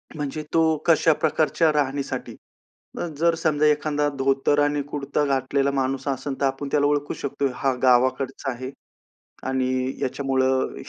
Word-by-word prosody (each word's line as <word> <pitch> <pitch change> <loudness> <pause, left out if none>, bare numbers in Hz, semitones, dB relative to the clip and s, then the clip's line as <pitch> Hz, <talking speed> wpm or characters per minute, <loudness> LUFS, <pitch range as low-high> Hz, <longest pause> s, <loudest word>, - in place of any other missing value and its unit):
म्हणजे 150 +1 -4
तो 165 - +4 0.3
कशा 160 -1 +5
प्रकारच्या 155 +1 +2
राहणीसाठी. 140 -1 -2 0.6
अ, - - -1
जर 170 +1 +3
समजा 155 -2 +1
एखादा 150 0 +2
धोतर 135 +2 +2
आणि 145 0 +1
कुर्ता 145 0 -1
घातलेला 135 0 +1
माणूस 135 0 -2
असेल, 135 0 -3
तर - - +3
आपण 135 +1 -2
त्याला 145 -1 +3
ओळखू 145 0 0
शकतो. 140 0 -2
हा 135 -2 0
गावाकडचा 130 +2 +2
आहे, 130 +2 -6 0.8
आणि 130 0 0
याच्यामुळं 130 0 0
140 Hz, 140 wpm, -24 LUFS, 130-150 Hz, 0.8 s, कशा